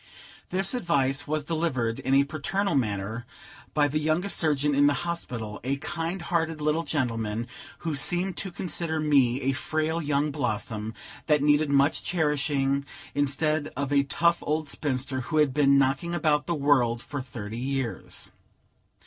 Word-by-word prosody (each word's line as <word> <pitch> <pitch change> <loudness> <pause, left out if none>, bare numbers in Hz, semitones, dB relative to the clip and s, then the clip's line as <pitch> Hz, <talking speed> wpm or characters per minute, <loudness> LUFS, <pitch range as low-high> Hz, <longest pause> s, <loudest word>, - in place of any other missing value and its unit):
This 190 +3 0
advice 145 - +1
was 155 0 -1
delivered, 145 -8 -1
in 130 +1 +1
a 140 - +6
paternal 175 +7 -1
manner, 110 -2 -1 0.5
by 145 -1 +4
the 150 +2 -1
youngest 160 +6 0
surgeon 150 -2 +2
in 145 +1 +5
the 145 - +3
hospital, 120 -11 -4
a 135 +2 0
kind 170 +4 -3
hearted 165 -2 0
little 150 +2 +1
gentleman, 115 -7 -1 0.4
who 160 - 0
seemed 175 +6 0
to 195 - -3
consider 170 -2 -2
me 140 -4 +3
a 135 - +1
frail 155 +4 -1
young 145 0 +1
blossom, 110 -5 -2 0.3
that 150 -3 +3
needed 145 0 +4
much 140 +1 +3
cherishing, 145 -4 +1 0.3
instead 145 +2 0
of 140 0 -1
a 140 - +5
tough 170 +5 +2
old 155 0 -1
spinster, 130 -2 -2
who 155 +6 -2
had 150 -3 +4
been 140 -1 +5
knocking 140 +6 +1
about 150 -3 +1
the 170 - 0
world 130 -5 +2
for 140 -2 -4
thirty 115 -3 -6
years. 135 -2 -3
145 Hz, 155 wpm, -27 LUFS, 135-160 Hz, 0.5 s, a